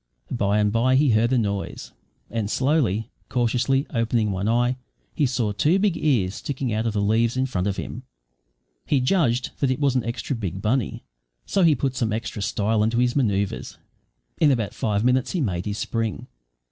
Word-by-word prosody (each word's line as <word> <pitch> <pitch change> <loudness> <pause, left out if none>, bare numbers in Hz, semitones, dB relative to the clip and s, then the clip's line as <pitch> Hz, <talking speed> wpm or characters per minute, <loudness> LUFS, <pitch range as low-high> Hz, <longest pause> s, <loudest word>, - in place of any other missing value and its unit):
By 105 -4 +1
and 105 -1 +2
bye 120 +4 +3
he 140 -1 +4
heard 115 +2 +3
a 130 - +3
noise, 100 -4 -3 0.4
and 110 -2 -2
slowly, 125 - +1 0.2
cautiously 125 +3 +1
opening 115 -2 +1
one 95 +3 -1
eye, 120 +2 +2 0.4
he 145 - +2
saw 120 -4 -1
two 150 - +2
big 195 -3 +2
ears 115 - +1
sticking 130 -2 -3
out 110 +2 0
of 110 - -1
the 105 - 0
leaves 115 +4 +2
in 130 - +2
front 100 -7 -2
of 100 - -2
him. 120 - -5 0.9
He 140 - +3
judged 125 -4 +1
that 140 - +2
it 130 +1 0
was 140 -3 +2
an 130 - +1
extra 120 +4 -3
big 95 -5 -4
bunny, 110 +3 -1 0.4
so 195 - +1
he 165 -4 +5
put 130 0 -2
some 120 -4 0
extra 105 -1 -3
style 105 +3 0
into 115 +2 +1
his 120 0 +2
manoeuvres. 100 -7 -1 0.6
In 155 - +5
about 115 -7 0
five 105 -1 -1
minutes 125 +1 +2
he 180 - 0
made 95 - -1
his 105 0 -3
spring. 115 -3 -2
115 Hz, 190 wpm, -24 LUFS, 105-130 Hz, 0.9 s, he